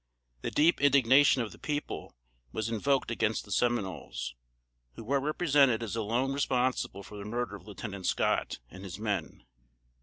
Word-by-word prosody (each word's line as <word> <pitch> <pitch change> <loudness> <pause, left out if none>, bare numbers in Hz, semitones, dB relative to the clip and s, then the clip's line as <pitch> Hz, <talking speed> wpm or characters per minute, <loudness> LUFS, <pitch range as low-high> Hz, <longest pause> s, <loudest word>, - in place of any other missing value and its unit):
The - - -2
deep 160 +1 +3
indignation 135 -1 +5
of 110 - -6
the - - -14
people 145 - -4 0.4
was 110 - -2
invoked 130 +4 +1
against 110 -1 0
the 100 - -12
Seminoles, 110 - -1 0.6
who - - -8
were 140 +5 +1
represented 140 -6 +3
as 115 -1 -4
alone 115 +5 0
responsible 130 -6 0
for 105 - -10
the - - -6
murder 115 -1 -3
of 105 - -13
Lieutenant 100 -2 -6
Scott, - - +1
and 95 +1 -10
his 95 -2 -6
men. 105 -2 -3
115 Hz, 155 wpm, -30 LUFS, 105-135 Hz, 0.6 s, indignation